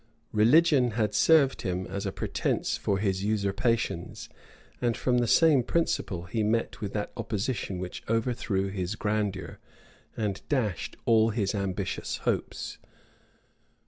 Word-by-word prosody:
[] - - -42
Religion 135 -1 +5
had 105 -2 +1
served 140 +4 +4
him 95 -3 -2
as 100 +2 -4
a - - -2
pretence - - -1
for 100 - 0
his 95 -1 -1
usurpations; 105 -1 -1 0.5
and 120 -2 +1
from 125 -1 +2
the 120 - +1
same 155 0 +5
principle 115 - -1
he 100 +6 -2
met 110 +1 0
with 100 -2 -3
that 105 -1 -2
opposition 105 -2 -2
which 90 0 -6
overthrew 115 -4 0
his 95 0 -3
grandeur, 105 -4 -2 0.6
and 105 -3 -2
dashed 115 - -1
all 110 -1 +5
his 105 -3 -1
ambitious 100 -2 -2
hopes. - - -2
105 Hz, 135 wpm, -28 LUFS, 95-120 Hz, 0.6 s, Religion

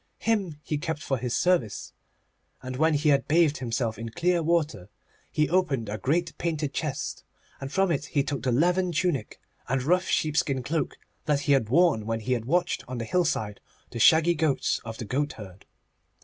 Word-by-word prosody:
Him 205 -8 0
he 150 - -2
kept 160 -1 -4
for 135 -3 -1
his 125 0 -1
service, 125 - 0 0.7
and 130 0 -5
when 160 +3 +3
he 150 +1 +2
had 140 -1 +3
bathed 155 -1 +3
himself 115 -3 -2
in 115 0 -5
clear 175 +7 +1
water, 155 - 0 0.4
he 150 0 +2
opened 145 - 0
a 105 +1 -4
great 165 - 0
painted 155 -4 -2
chest, 150 -4 -3 0.4
and 135 0 -6
from 195 0 +2
it 145 -2 -1
he 145 -3 0
took 140 -3 -3
the 125 - 0
leathern 175 +7 +2
tunic 170 - -1 0.3
and 135 0 0
rough 180 +6 +2
sheepskin 145 -4 0
cloak 150 +2 -2 0.3
that 150 -2 +1
he 145 - 0
had 135 -6 +3
worn 140 -7 +3
when 115 0 -2
he 125 +4 0
had 115 -2 -2
watched 175 +6 0
on 125 0 -5
the 115 - -3
hillside 110 - 0 0.3
the 120 - -5
shaggy 160 +7 +6
goats 155 -4 0
of 115 -1 -7
the 115 - -5
goatherd. 105 -7 -4
145 Hz, 185 wpm, -26 LUFS, 120-170 Hz, 0.7 s, shaggy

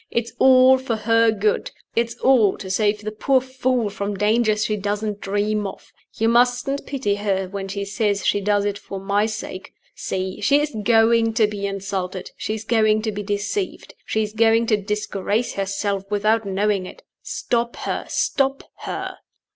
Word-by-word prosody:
It's 235 0 -2
all 260 0 +7
for 255 -3 -2
her 230 +1 +3
good; 210 -1 0 0.3
it's 235 0 0
all 240 -7 +4
to 190 -2 -6
save 210 +1 +1
the 215 - -3
poor 260 +5 +2
fool 255 -4 -1
from 200 0 -4
dangers 215 +1 +2
she 215 - 0
doesn't 205 +1 -3
dream 205 +1 -1
of. 195 - -11 0.2
You 225 - +1
mustn't 245 +4 +2
pity 260 -7 -1
her 200 -2 -1
when 195 0 -5
she 200 +1 -4
says 205 0 -1
she 205 - +2
does 205 0 +1
it 205 0 -2
for 195 - -7
my 200 +2 +1
sake. 210 -3 -7 0.2
See! 185 0 -4
she 285 +1 +4
is 295 -2 -2
going 225 +1 +4
to 225 -2 +4
be 205 -1 -3
insulted; 195 -2 -4
she 215 - -3
is 220 - -6
going 215 -1 +2
to 220 - -1
be 205 0 -4
deceived; 205 - -3
she 220 - 0
is 210 0 -5
going 225 +1 +3
to - - +5
disgrace 210 +2 -2
herself 195 0 -2
without 215 +2 +1
knowing 195 -1 0
it. - - -13 0.2
Stop 235 0 -2
her! - - -3
stop 275 0 0
her!" - - -5
210 Hz, 175 wpm, -22 LUFS, 200-230 Hz, 0.3 s, all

